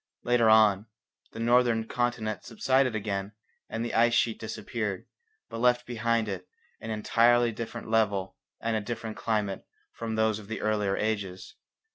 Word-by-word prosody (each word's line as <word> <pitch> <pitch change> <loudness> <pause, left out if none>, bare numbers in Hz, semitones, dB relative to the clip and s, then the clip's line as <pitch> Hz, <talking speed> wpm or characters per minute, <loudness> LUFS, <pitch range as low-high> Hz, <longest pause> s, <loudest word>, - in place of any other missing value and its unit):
Later 120 -2 +3
on, 110 -1 +5 0.4
the - - -9
northern 120 -1 +3
continent 120 -3 -2
subsided 130 +1 +1
again 100 -1 -3 0.4
and 115 +1 -3
the 120 - -4
ice 115 +1 +4
sheet 115 -2 +1
disappeared, 110 -3 -4 0.4
but 115 - -7
left 125 0 +3
behind 115 -1 0
it 95 -2 -5 0.3
an 110 - -7
entirely 120 +2 +3
different 115 +1 -6
level 100 -4 +1 0.2
and 115 -1 -1
a 110 - 0
different 110 0 -5
climate 105 -4 -1 0.3
from 115 -1 -4
those 110 -1 +1
of 105 - -12
the 115 - -4
earlier 105 -2 0
ages. 100 -4 -3
110 Hz, 150 wpm, -28 LUFS, 105-115 Hz, 0.4 s, on